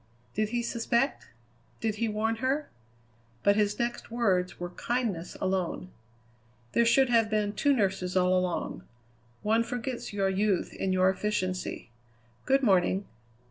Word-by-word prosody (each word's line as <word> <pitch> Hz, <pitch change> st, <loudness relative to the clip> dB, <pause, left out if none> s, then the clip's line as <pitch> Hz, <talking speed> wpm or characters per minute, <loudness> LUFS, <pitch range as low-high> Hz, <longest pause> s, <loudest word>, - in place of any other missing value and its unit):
Did 215 Hz, 0 st, 0 dB
he 240 Hz, +1 st, -1 dB
suspect? 235 Hz, +3 st, 0 dB, 0.5 s
Did 215 Hz, -1 st, -1 dB
he 230 Hz, +1 st, 0 dB
warn 220 Hz, +1 st, 0 dB
her? 270 Hz, +5 st, 0 dB, 0.8 s
But 200 Hz, 0 st, +5 dB
his 210 Hz, -1 st, +1 dB
next 240 Hz, 0 st, -2 dB
words 195 Hz, -6 st, 0 dB
were 175 Hz, 0 st, -4 dB
kindness 225 Hz, -7 st, -2 dB
alone. 185 Hz, -1 st, -1 dB, 0.8 s
"There 235 Hz, -, +3 dB
should 245 Hz, +3 st, +4 dB
have 230 Hz, -2 st, +4 dB
been 210 Hz, -1 st, 0 dB
two 285 Hz, -, +2 dB
nurses 190 Hz, -6 st, +1 dB
all 185 Hz, 0 st, +4 dB
along. 180 Hz, -1 st, -1 dB, 0.6 s
One 220 Hz, +2 st, +3 dB
forgets 245 Hz, +1 st, -4 dB
your 200 Hz, -2 st, 0 dB
youth 195 Hz, 0 st, 0 dB
in 190 Hz, -, -2 dB
your 185 Hz, 0 st, +4 dB
efficiency. 185 Hz, -, -3 dB, 0.6 s
Good 270 Hz, +1 st, +3 dB
morning." 190 Hz, -2 st, +3 dB
210 Hz, 140 wpm, -29 LUFS, 185-235 Hz, 0.8 s, But